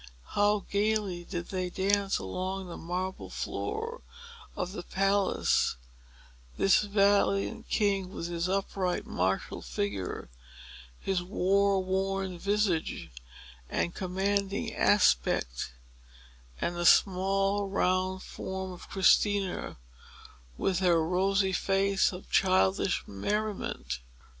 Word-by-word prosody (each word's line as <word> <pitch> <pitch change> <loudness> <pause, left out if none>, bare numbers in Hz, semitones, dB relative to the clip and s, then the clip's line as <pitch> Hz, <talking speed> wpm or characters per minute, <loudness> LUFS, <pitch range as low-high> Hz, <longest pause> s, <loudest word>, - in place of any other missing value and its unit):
How 205 0 +2
gayly 205 -3 0
did 175 -2 -5
they 185 -1 -2
dance 195 +2 +1
along 185 - -4
the 175 - -7
marble 180 +3 -4
floor 455 +3 -4 0.5
of 180 - -3
the 190 - -5
palace, 195 +2 +1 0.8
this 195 - +5
valiant 205 +2 +2
king, 195 -3 +1
with 175 - -6
his 170 +1 -2
upright, 190 -1 -1
martial 95 +2 -1
figure, 95 +10 -3 0.7
his 190 -2 -1
warworn 190 0 +1
visage, 200 - 0 0.6
and 170 - -1
commanding 195 +1 -1
aspect, - - +2 0.9
and 175 - -1
the 175 0 +2
small, 195 +1 +3
round 185 -1 0
form 190 0 -5
of 180 - -11
Christina, 195 0 +2 0.8
with 185 -2 0
her 170 -4 +3
rosy 190 +2 +2
face 195 +1 +2
of 180 0 -9
childish 190 0 +3
merriment! 195 - -3
190 Hz, 100 wpm, -29 LUFS, 180-200 Hz, 0.9 s, this